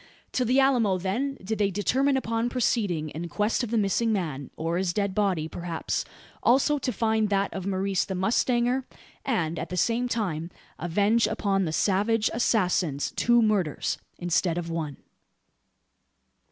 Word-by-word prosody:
To 255 - +1
the 250 +3 +3
Alamo, 240 -8 +3
then, 240 +10 -2
did 220 +3 -3
they 200 -1 +3
determine 265 +8 +1
upon 230 -1 -1
proceeding 205 -10 0
in 170 +3 -6
quest 210 +6 0
of 240 - -3
the 230 - 0
missing 220 +2 +1
man, 155 -10 -2
or 165 +2 -1
his 185 -1 0
dead 200 -1 0
body 190 -6 0
perhaps, 170 0 -3 0.4
also, 275 +4 +3
to 255 - -1
find 220 -2 +1
that 200 0 0
of 190 0 -4
Maurice 195 0 0
the 190 - -4
mustanger; 240 +6 +1 0.4
and, 170 -11 -1
at - - -5
the 180 - -4
same 235 +6 +1
time, 180 -9 -2 0.3
avenge 205 +7 +2
upon 200 -3 0
the 160 - -2
savage 210 +6 +1
assassins 180 - +1
two 240 0 +3
murders 200 -9 0 0.2
instead 175 0 0
of 170 -1 -3
one. 155 -4 -3
200 Hz, 155 wpm, -26 LUFS, 175-235 Hz, 0.4 s, the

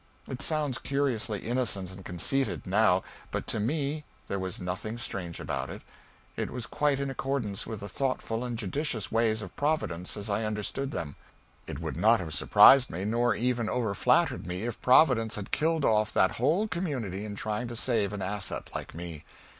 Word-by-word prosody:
It 130 0 -5
sounds 150 -4 +1
curiously 130 -7 -1
innocent 110 -6 -1
and 95 0 -11
conceited, 90 - -1
now, 95 -1 +3 0.3
but - - -3
to 110 - -1
me 145 +6 -1 0.3
there 100 - -1
was 95 -1 -4
nothing 95 +5 -4
strange 90 -9 -5
about - - -3
it; - - -8 0.5
it - - -2
was 125 -3 -4
quite 145 -2 +1
in 140 -1 -1
accordance 135 -7 -2
with 110 -3 -5
the 100 - -5
thoughtful 125 -2 -2
and 120 -2 -3
judicious 110 - -2
ways 110 -1 +2
of 95 - -10
Providence 125 - -1
as 105 0 -5
I 105 +1 0
understood 110 +6 -2
them. 80 - -5 0.5
It - - -5
would - - -4
not 115 +2 +5
have 80 -4 -5
surprised 130 - +7
me, 90 +4 -4
nor 115 +1 +2
even 120 -2 0
over 115 -5 0
flattered 95 - +2
me, 90 +3 -3
if 120 -1 -4
Providence 125 -4 +5
had 100 -2 -6
killed 160 -1 +2
off 110 -1 +3
that 95 - +4
whole 160 - +2
community 130 - -3
in 105 -1 -5
trying 110 +3 -2
to 120 - -6
save 110 -4 +1
an 100 -2 -4
asset 100 +1 -3
like - - -6
me. 85 -3 -7
110 Hz, 185 wpm, -29 LUFS, 100-135 Hz, 0.5 s, surprised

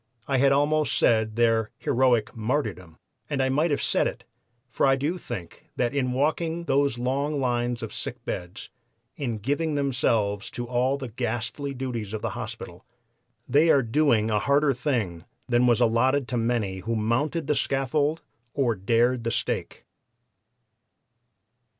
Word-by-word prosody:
I 135 -2 +1
had 135 +1 +4
almost 145 +2 +2
said 110 -1 +2
their 115 -2 +2
heroic 120 -3 +1
martyrdom! 105 - -3 0.3
And 145 -2 -1
I 130 0 +2
might 150 +6 +2
have 145 - 0
said - - +2
it, - - -6 0.5
for - - +2
I 135 - +5
do 150 +7 -2
think 85 - -8
that 120 +1 0
in 130 -3 0
walking 160 +5 0
those 140 -5 +1
long 140 +4 -1
lines 120 -2 -1
of 115 - -6
sick - - -5
beds, 90 +5 -6 0.4
in 120 -6 -3
giving 145 +8 -1
themselves 115 -7 0
to 120 - -3
all 125 +3 +1
the 130 -3 -6
ghastly 125 +4 -3
duties 120 -5 -4
of 110 - -4
the 110 - -1
hospital, 110 -5 -7 0.6
they 155 +4 +4
are 140 -4 +5
doing 115 -3 +2
a 105 - +2
harder 140 +3 +3
thing 115 - -2 0.2
than 120 0 +3
was 120 -1 +4
allotted 125 +3 +2
to 125 - -2
many 115 -5 -1
who 115 +5 -2
mounted 135 +10 0
the - - +1
scaffold 145 +3 0 0.3
or 130 -5 +2
dared 115 +5 +1
the 115 - 0
stake." - - -3
125 Hz, 155 wpm, -26 LUFS, 115-140 Hz, 0.6 s, I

